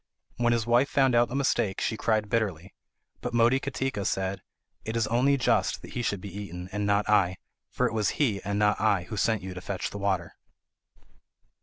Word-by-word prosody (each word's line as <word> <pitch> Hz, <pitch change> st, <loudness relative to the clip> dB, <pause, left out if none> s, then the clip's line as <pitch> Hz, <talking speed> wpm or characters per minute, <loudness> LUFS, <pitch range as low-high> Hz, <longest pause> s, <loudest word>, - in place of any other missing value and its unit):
When 120 Hz, 0 st, +2 dB
his 115 Hz, -2 st, +1 dB
wife 120 Hz, +4 st, +3 dB
found 135 Hz, -2 st, +3 dB
out 120 Hz, 0 st, +4 dB
the 125 Hz, -, -5 dB
mistake, 130 Hz, -8 st, +1 dB
she 110 Hz, -, -1 dB
cried 110 Hz, -1 st, 0 dB
bitterly; 95 Hz, -6 st, -2 dB, 0.5 s
but 120 Hz, -1 st, -4 dB
Motikatika 130 Hz, -1 st, +1 dB
said: 95 Hz, 0 st, -1 dB, 0.4 s
"It 110 Hz, -, -4 dB
is 115 Hz, -, +2 dB
only 125 Hz, +5 st, +2 dB
just 125 Hz, -, +1 dB
that -, -, -10 dB
he 120 Hz, -, -3 dB
should 100 Hz, -5 st, -2 dB
be 100 Hz, -1 st, -8 dB
eaten, 90 Hz, -3 st, -7 dB
and 105 Hz, +1 st, -2 dB
not 100 Hz, +1 st, +2 dB
I; 95 Hz, -4 st, +3 dB, 0.3 s
for -, -, 0 dB
it -, -, -1 dB
was 110 Hz, -3 st, +1 dB
he, 110 Hz, -10 st, +1 dB
and 100 Hz, +1 st, -2 dB
not 105 Hz, -1 st, +2 dB
I, 100 Hz, -4 st, +2 dB
who 110 Hz, +5 st, -7 dB
sent 110 Hz, 0 st, +1 dB
you 95 Hz, 0 st, -6 dB
to 90 Hz, -, -7 dB
fetch 95 Hz, 0 st, -4 dB
the 100 Hz, -, -6 dB
water." 95 Hz, -4 st, -1 dB
105 Hz, 200 wpm, -27 LUFS, 95-120 Hz, 0.5 s, out